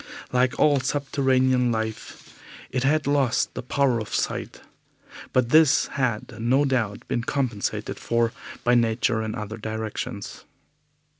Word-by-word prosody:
Like 125 0 +1
all 145 -2 +4
subterranean 130 -3 +1
life, 110 -1 -5 0.4
it 130 - -1
had 150 +2 +2
lost 140 -3 +1
the - - -5
power 130 -1 +1
of 110 - -6
sight, - - -2 0.7
but 125 -2 +2
this 155 0 +5
had 120 -7 -2
no 130 +5 +3
doubt 115 -7 -1
been 120 - -1
compensated 120 -6 -2
for 115 0 0 0.3
by 120 - +3
nature 115 -1 +2
in 110 0 -3
other 110 -1 -5
directions. 110 -2 -5
125 Hz, 130 wpm, -24 LUFS, 110-135 Hz, 0.7 s, this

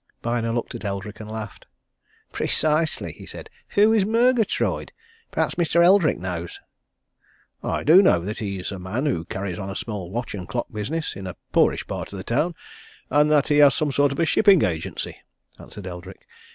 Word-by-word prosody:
Byner 115 -1 -1
looked 120 +2 -3
at 120 - -7
Eldrick 100 +1 -5
and 110 -1 -8
laughed. 110 -2 -7 0.6
"Precisely!" 155 +1 0
he - - -13
said. 445 - -9 0.2
"Who 210 +2 +5
is 215 -3 +4
Murgatroyd? 230 +1 +1 0.4
Perhaps - - 0
Mr. 170 +1 +4
Eldrick 185 -3 +5
knows." 85 -1 -5 1.0
"I - - -2
do 160 +4 +7
just 195 - +7
know 85 - +5
that 105 +5 -4
he's 100 -3 -4
a 95 - -6
man 105 +10 -3
who 85 - -1
carries 95 -1 -4
on 95 -1 -5
a 100 - -5
small 105 -6 -5
watch 120 +5 -4
and 95 -4 -6
clock 120 - -2
business 145 +10 -3
in 95 -1 -7
a 90 - -6 0.2
poorish - - +2
part - - -5
of 100 - -7
the 95 - -6
town, 150 +11 0 0.6
and 150 +1 +4
that 150 -1 +3
he 145 - +3
has 145 -2 +7
some 155 -3 +1
sort 140 +1 +2
of 140 - -5
a 165 - +3
shipping 195 0 +5
agency," 80 -3 -2 0.4
answered 100 - -10
Eldrick. 90 +1 -9
120 Hz, 190 wpm, -23 LUFS, 95-155 Hz, 1.0 s, do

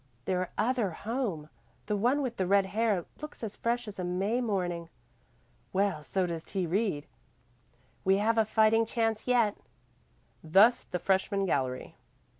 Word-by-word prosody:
"Their 185 -1 -1
other 235 -2 +1
home 200 - -3 0.4
the 210 - -1
one 250 +8 +2
with 245 -3 -3
the 185 - 0
red 200 +1 +4
hair 205 -2 0 0.2
looks 300 -5 -8
as 210 -2 -4
fresh 240 0 -1
as 205 -2 -8
a - - -2
May 195 +7 0
morning." 175 -7 -2 0.8
"Well, 195 -5 +1
so 185 +5 0
does 165 -2 -4
T. 190 -3 -2
Reed." 175 -4 0 1.0
"We 190 +1 +4
have 225 +3 +2
a - - +6
fighting 220 +1 +3
chance 225 -1 -1
yet." 235 -4 +3 0.9
Thus 200 +10 +5
the 180 - -3
freshman 195 +2 +1
gallery. 130 -7 -2
200 Hz, 150 wpm, -30 LUFS, 180-225 Hz, 1.0 s, a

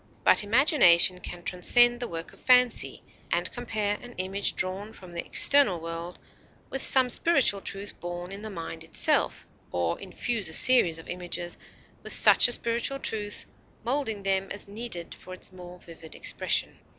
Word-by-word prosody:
But - - +5
imagination 205 - +4
can 175 -1 -9
transcend 240 +8 +4
the 245 - -4
work 165 -3 -8
of - - -19
fancy, 250 -1 +3 0.3
and - - -1
compare 215 -4 -3
an 245 0 -12
image 190 +1 -3
drawn 195 +3 -3
from 185 -2 -13
the 170 - -4
external 275 -12 +3
world 165 +1 -7 0.5
with 270 - -3
some 255 -2 +6
spiritual 265 -10 +2
truth 200 +1 -6
born 175 +1 -7
in 200 +1 -8
the 215 - -7
mind 165 -3 -7
itself, 165 - 0 0.3
or 85 -1 -2
infuse 200 +1 -3
a - - -5
series 180 -7 +3
of 165 - -11
images 175 -1 -5 0.5
with - - -4
such - - +7
a - - -2
spiritual 235 +3 -1
truth, 210 -5 -4 0.4
molding 230 -5 -3
them 195 0 0
as 200 - -6
needed 205 -5 -6
for 185 - -11
its 185 - -10
more 180 -1 -12
vivid 165 -2 -13
expression. - - -1
195 Hz, 165 wpm, -26 LUFS, 175-240 Hz, 0.5 s, such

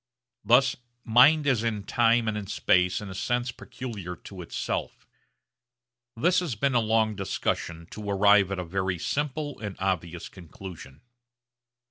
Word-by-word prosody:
Thus 130 +3 +4 0.3
mind 135 +7 +5
is 130 -6 +2
in 110 -3 -2
time 115 +2 +2
and 110 - 0
in 105 -2 -5
space 90 -1 +2
in 100 -2 -7
a - - -6
sense 120 +5 -1
peculiar 105 -8 -7
to 95 +1 -10
itself. 85 - -4 1.1
This 175 +9 +3
has 170 -10 -3
been 135 +6 0
a 120 - +4
long 110 -1 +1
discussion 85 -3 -3
to 105 -1 -6
arrive 100 -1 +5
at 95 - -2
a 90 - -3
very 95 +1 -2
simple 145 - -3
and 105 -3 -5
obvious 90 -3 -2
conclusion. 85 -5 -11
105 Hz, 145 wpm, -27 LUFS, 95-120 Hz, 1.1 s, mind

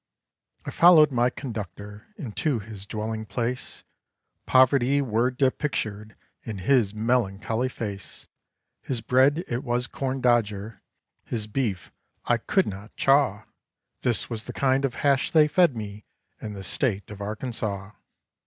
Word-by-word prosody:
I - - -4
followed 165 -4 +7
my 120 -1 +2
conductor 105 -4 -7
into 140 - -1
his 105 -2 -8
dwelling 110 +1 -4
place; 120 +3 -4 0.6
Poverty 130 +1 +4
were 120 -2 +1
depictured 125 -5 -2 0.3
in 110 -3 -6
his 110 +1 +2
melancholy 110 +1 0
face. 100 -6 -7 0.5
His 125 -4 -3
bread 135 +7 +3
it 120 +2 -3
was 120 -1 0
corn 135 +1 -3
dodger, 110 -4 0 0.4
his 110 -3 -2
beef 105 -4 -3 0.3
I 120 - +3
could 190 - +1
not 100 +2 -8
chaw; 135 -7 +3 0.6
This 120 -4 0
was 110 -2 -3
the 125 - -7
kind 135 0 +2
of 130 - -3
hash 140 -2 +2
they 155 -2 +5
fed 170 -3 +3
me 105 -1 -7 0.4
in 105 -1 -5
the 100 -1 -8
State 105 +1 -1
of 105 - -9
Arkansaw. 105 -2 -4
120 Hz, 135 wpm, -25 LUFS, 105-130 Hz, 0.6 s, followed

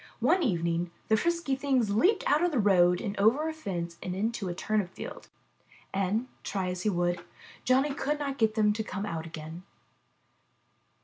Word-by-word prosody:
One 370 - +3
evening 170 - 0 0.2
the 220 - +5
frisky 335 +1 0
things 265 -6 +1
leaped 365 - +3
out 300 +4 +3
of 355 - +2
the 290 - -1
road 180 -4 +4
and 205 -3 -3
over 245 +10 +4
a 320 - -2
fence 175 - -5
and 180 0 -4
into 215 -1 -2
a 175 - -4
turnip 210 -1 0
field, - - -8 0.7
and, 195 +5 0 0.2
try 190 -2 -2
as 180 0 -4
he 215 - +1
would, 175 -2 0 0.4
Johnny 270 +3 +3
could 295 +1 -1
not 280 -2 -4
get 220 -1 +2
them 210 -2 +3
to 220 +1 -2
come 200 -1 -4
out 165 -4 -4
again.' 160 +1 -8
210 Hz, 180 wpm, -29 LUFS, 180-270 Hz, 0.7 s, the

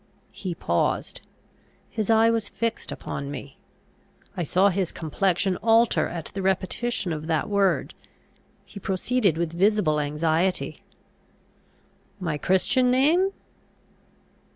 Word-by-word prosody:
He 185 -4 -5
paused. 85 - -1 0.7
His 215 -2 -3
eye 225 0 +5
was 225 -2 -1
fixed 230 -1 -3
upon 140 0 -5
me. 140 -1 -8 0.8
I - - -3
saw 185 +5 +3
his 190 -2 -1
complexion 185 +3 0
alter 230 +1 +3
at 170 -2 -6
the 195 - -3
repetition 190 +1 -1
of 155 0 -6
that 160 +3 0
word. 200 -2 +1 0.7
He 200 - -10
proceeded 195 -1 0
with 170 -1 -2
visible 185 -4 +2
anxiety. 160 +5 0 1.4
My 165 -5 -2
Christian 250 - +2
name? 310 +10 +3
190 Hz, 110 wpm, -25 LUFS, 165-220 Hz, 1.4 s, eye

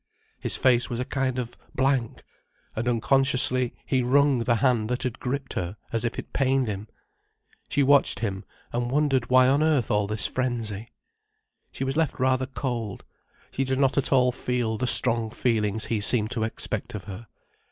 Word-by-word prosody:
His - - -2
face 125 -2 +2
was 120 - -3
a 125 - -2
kind 130 -2 -2
of 120 -2 -4 0.2
blank, 130 -3 0 0.5
and 115 +2 -3
unconsciously 130 +1 +3
he 130 -2 +1
wrung 135 +1 +3
the 120 0 +1
hand 120 -3 +1
that 125 0 -2
had 125 -1 -4
gripped 135 +1 -4
her, 90 +4 -4 0.2
as 115 -1 0
if 120 - -2
it - - -8
pained 135 -1 +1
him. 105 0 -5 0.8
She 145 - +2
watched 140 +1 +5
him, 100 -3 -3 0.3
and 120 0 -1
wondered 135 -3 +1
why 130 0 +5
on 140 +3 +3
earth 155 -7 +1
all 105 -1 +1
this 105 -1 -1
frenzy. 115 -4 -3 0.8
She - - -5
was 135 +1 -2
left 160 -4 0
rather 130 0 +1
cold, 120 -5 -4 0.5
she 135 - -1
did 130 0 -1
not 135 -1 +2
at 140 - 0
all 125 -2 +4
feel 120 -2 -2
the 125 +4 -2
strong 115 -2 +1
feelings 110 -2 0
he 110 -3 -1
seemed 110 +1 +3
to 115 -3 0
expect 110 - -4
of 100 - -6
her. 105 +3 -9
125 Hz, 180 wpm, -25 LUFS, 115-130 Hz, 0.8 s, watched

